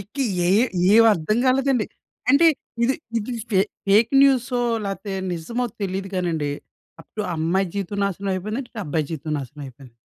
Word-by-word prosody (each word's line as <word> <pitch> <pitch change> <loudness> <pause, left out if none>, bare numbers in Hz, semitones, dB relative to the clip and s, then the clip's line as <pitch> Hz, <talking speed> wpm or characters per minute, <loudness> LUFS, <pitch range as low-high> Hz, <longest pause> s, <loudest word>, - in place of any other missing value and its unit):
ఇంక 200 +7 -14 0.3
ఏ - - +2
ఏ 200 +4 +5 0.4
ఏవర్థం 215 -2 +4
కాలేదండి. 260 -2 +2 0.4
అంటే 290 +5 +6 0.4
ఇది, 260 +3 +2 0.2
ఇది 225 +3 -5 0.2
ఫే 190 -3 +4 0.3
ఫేక్ 220 +4 +5
న్యూసో 255 -2 +3 0.3
లేతే 195 0 -4 0.2
నిజమో 230 +9 -3 0.2
తెలీదు 195 0 -3
కానండి. 165 -5 -1 0.5
అప్పుడు 210 -1 -6
అమ్మాయి 175 +4 +1
జీవితం 200 +1 -3
నాశనమయిపోయిందండి. 200 +5 -3
ఇటు 225 - -6
అబ్బాయి 150 0 -1
జీవితం 155 -1 -4
నాశనమయిపోయింది. 135 -2 -10
195 Hz, 135 wpm, -23 LUFS, 165-230 Hz, 0.5 s, అంటే